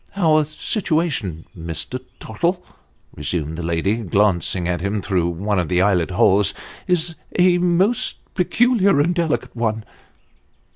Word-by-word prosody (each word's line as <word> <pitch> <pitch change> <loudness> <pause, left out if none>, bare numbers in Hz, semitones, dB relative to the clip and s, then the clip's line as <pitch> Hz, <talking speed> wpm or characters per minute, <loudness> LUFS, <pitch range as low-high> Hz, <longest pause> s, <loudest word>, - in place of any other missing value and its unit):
"Our 155 -5 +3
situation, 155 - -1
Mr. 80 - -5 0.2
Tottle," 170 - -2 0.5
resumed 75 +1 -2
the 85 - -5
lady, 85 +6 0
glancing 95 -4 +1
at 90 -1 -1
him 100 +2 -1
through 90 -3 0
one 100 +4 -1
of 85 - -2
the 90 -1 +2
eyelet 95 -3 +2
holes, 100 +2 +3 0.2
" - - -16
is 175 -2 +1 0.2
a 180 0 +4
most 180 +6 +1 0.2
peculiar 200 - +3
and 165 +5 +2
delicate 165 -7 -1
one." 110 -2 -2
105 Hz, 135 wpm, -20 LUFS, -, 0.5 s, a